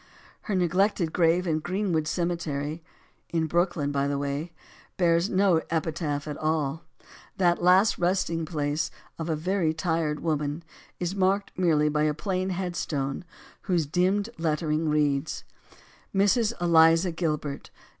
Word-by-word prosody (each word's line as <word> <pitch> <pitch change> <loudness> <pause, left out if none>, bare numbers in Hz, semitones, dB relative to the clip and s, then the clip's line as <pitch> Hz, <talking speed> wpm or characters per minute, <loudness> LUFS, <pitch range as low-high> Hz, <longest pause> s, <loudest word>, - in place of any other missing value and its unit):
Her 205 - +1
neglected 180 -1 +1
grave 175 +1 +3
in 160 -3 0
Greenwood 175 -2 -1
Cemetery, 160 -2 -2 0.5
in 165 -1 0
Brooklyn, 170 -3 0
by 140 0 0
the 140 0 -1
way 145 +4 -3 0.5
bears 170 +1 +3
no 185 -4 +3
epitaph 155 -2 -2
at 150 -1 -4
all. 155 -1 -1 0.6
That 175 -2 +2
last 185 +4 +4
resting 175 -2 0
place 150 -1 -1 0.3
of 165 0 -3
a 160 - +1
very 165 0 0
tired 160 -2 -1
woman 150 0 -2 0.4
is 175 +1 -2
marked 195 +1 +1
merely 160 -5 +2
by 150 0 +1
a 150 -1 +1
plain 185 +2 -2
headstone, 175 -7 -3 0.5
whose 175 -4 +2
dimmed 190 +8 +1
letter 155 -1 0
ing 155 +1 +1
reads: 150 0 0 0.7
Mrs. 210 +4 +3
Eliza 165 +1 +5
Gilbert. 150 -4 -3
165 Hz, 135 wpm, -26 LUFS, 150-180 Hz, 0.7 s, Eliza